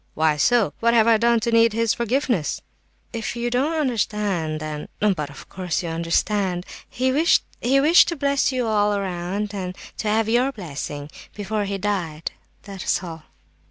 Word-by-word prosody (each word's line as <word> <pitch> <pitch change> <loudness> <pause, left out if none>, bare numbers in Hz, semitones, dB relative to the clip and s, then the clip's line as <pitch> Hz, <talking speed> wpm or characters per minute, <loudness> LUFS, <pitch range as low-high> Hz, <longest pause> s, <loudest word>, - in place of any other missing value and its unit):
why 155 -1 +2
so? 235 +7 +2
What 235 0 +3
have 225 -2 +5
I 230 -1 +5
done 235 +1 +3
to 235 - 0
need 230 -1 +4
his 230 0 +2
forgiveness?" 235 - 0 0.5
"If 230 0 -3
you 240 0 -2
don't 270 +6 +1
understand, 205 - -1
then—but 155 +2 -2
of 145 - -12
course, 180 -2 -3
you 170 - -3
do - - -3
understand. 180 +2 0 0.2
He 260 +1 0
wished—he 275 -3 +2
wished 310 +5 +6
to 340 - -1
bless 280 -1 +1
you 255 -2 -1
all 210 -2 +2
round 195 +2 -3
and 185 -2 -5 0.2
to 220 - -3
have 215 +1 +2
your 245 +4 +2
blessing—before 185 - -5
he 200 0 -2
died—that's 190 +1 -4
all." 165 -3 -8
210 Hz, 160 wpm, -23 LUFS, 175-235 Hz, 0.5 s, wished